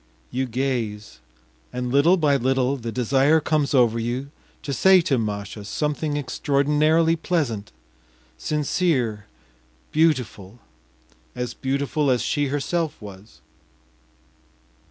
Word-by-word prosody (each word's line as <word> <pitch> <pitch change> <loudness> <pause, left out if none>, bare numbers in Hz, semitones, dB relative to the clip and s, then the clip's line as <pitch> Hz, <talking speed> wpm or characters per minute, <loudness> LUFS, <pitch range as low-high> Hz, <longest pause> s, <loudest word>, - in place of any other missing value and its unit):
You 130 +1 -1
gaze, 115 -4 -3 0.5
and 125 0 -3
little 150 +7 +4
by 150 -4 +2
little 130 +1 +1
the 115 -3 -5
desire 135 +6 +3
comes 150 -2 0
over 115 -3 +3
you 125 +5 -3 0.3
to 140 - -3
say 190 +8 +6
to 135 -6 0
Masha 105 -1 -4
something 150 +7 -2
extraordinarily 150 +4 +2
pleasant, 140 - -2 0.6
sincere, 130 - -1 0.6
beautiful, 125 - 0 0.8
as 125 0 -4
beautiful 140 +2 -1
as 125 -2 +2
she 145 -2 0
herself 155 +3 -2
was. 100 0 -13
135 Hz, 105 wpm, -23 LUFS, 115-150 Hz, 0.8 s, say